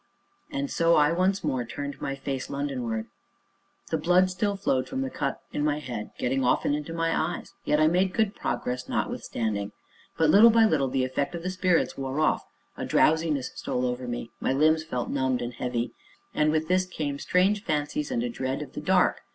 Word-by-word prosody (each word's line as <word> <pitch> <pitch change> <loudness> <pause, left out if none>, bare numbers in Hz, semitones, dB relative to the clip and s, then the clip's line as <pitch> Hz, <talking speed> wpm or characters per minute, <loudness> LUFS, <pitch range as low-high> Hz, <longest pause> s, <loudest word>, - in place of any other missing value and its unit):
And 280 -1 -2
so 165 0 +3
I, 150 0 +4
once 185 +3 +1
more, 130 -2 0
turned 140 +4 -6
my 135 - -2
face 135 -1 -4
London 140 -2 -3
wards. 110 -1 -3 0.8
The 160 - +1
blood 180 +3 +4
still 200 +2 0
flowed 135 -10 0
from 130 - -2
the 135 -1 -3
cut 140 - -2
in 145 - -1
my 150 -1 +1
head, 125 -7 -5
getting 130 +2 0
often 125 +3 +2
into 150 +2 -3
my 165 0 0
eyes, 170 +2 -2
yet 150 - +2
I 155 - +5
made 180 +4 +3
good 220 -3 +2
progress 125 0 -3
notwithstanding. 105 -3 -2 0.4
But, 160 -1 +4
little 215 +6 +8
by 225 0 +5
little, 150 -9 +2
the 130 0 0
effect 140 +5 -2
of 170 - -6
the 185 - -2
spirits 180 -5 +1
wore 135 +2 -2
off, 155 - +1 0.3
a - - -5
drowsiness 155 -4 +2
stole 125 0 -2
over 125 0 -3
me, 120 -1 -5
my - - 0
limbs 155 +3 +3
felt 125 -6 -3
numbed 130 -2 +1
and 120 +1 -4
heavy. 120 0 -2 0.4
And 150 0 +2
with 155 0 0
this 185 +1 +2
came 145 -5 -3
strange 195 +5 +2
fancies 155 - -1
and 245 -2 -1
a 245 - -1
dread 130 - -3
of - - -12
the - - -5
dark. - - +2
150 Hz, 200 wpm, -27 LUFS, 130-180 Hz, 0.8 s, little